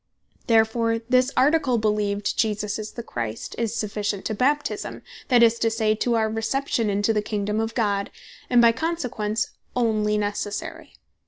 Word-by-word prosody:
Therefore 230 0 +3
this 255 +3 +2
Article 270 -2 +3
beleeved, 210 -2 0
Jesus 210 -1 -1
Is 215 0 -6
The 235 - -6
Christ, 115 - -5
is 230 -1 -1
sufficient 210 -2 -3
to 220 - -1
Baptisme, 285 +7 -1 0.2
that 245 -2 +5
is 230 0 +4
to 225 - +2
say, 220 -1 +1
to 235 +2 0
our 220 -1 +2
Reception 225 +1 -1
into 205 +2 +1
the 210 - +1
Kingdome 210 0 -2
of 225 0 -2
God, 200 -4 0 0.4
and 245 -1 +5
by 230 - +7
consequence, 230 -7 -2 0.2
onely 215 -3 +1
Necessary. 205 0 -4
220 Hz, 155 wpm, -24 LUFS, 210-235 Hz, 0.4 s, by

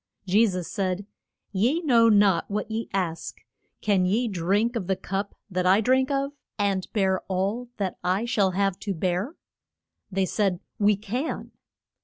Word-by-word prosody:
Je 205 +5 +4
sus 180 -3 -3
said, 190 0 -2 0.5
Ye 230 - +2
know 235 -6 +5
not 200 -5 +4
what 210 +2 -3
ye 225 +1 -3
ask. 180 -4 -3 0.4
Can 200 -3 +2
ye 215 +7 +2
drink 205 +5 +1
of 200 -6 -2
the 190 - +2
cup 195 +2 -4
that 180 -2 -1
I 190 +3 +6
drink 260 +4 +3
of, 275 0 0 0.3
and 200 -3 0
bear 190 -3 +1
all 200 +6 -1
that 195 -3 -3
I 185 +5 +1
shall 205 -5 +2
have 195 -2 +1
to 200 -3 -3
bear? 185 - -1 0.8
They 190 0 +1
said, 190 -2 0 0.2
We 205 0 +4
can. 225 +9 -4
200 Hz, 160 wpm, -26 LUFS, 185-225 Hz, 0.8 s, I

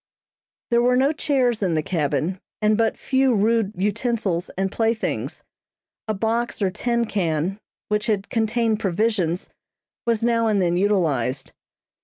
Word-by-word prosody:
There 235 0 +4
were 250 +1 +3
no 270 +3 +3
chairs 265 -7 +1
in 180 -5 +1
the 155 - 0
cabin, 160 +1 -1 0.2
and 215 0 +3
but 225 0 +1
few 265 -2 +2
rude 215 0 +2
utensils 205 -2 -1
and 195 0 0
playthings. 225 +1 -1 0.6
A 215 - -1
box 230 +4 -1
or 195 -3 +1
tin 235 +3 0
can, 180 -2 -1 0.3
which 210 0 -1
had 205 -3 -1
contained 225 -1 +1
provisions, 190 -3 0 0.6
was 230 -1 +1
now 230 -1 +2
and 210 -2 +2
then 175 -2 +2
utilized. 155 - 0
215 Hz, 140 wpm, -23 LUFS, 185-230 Hz, 0.6 s, There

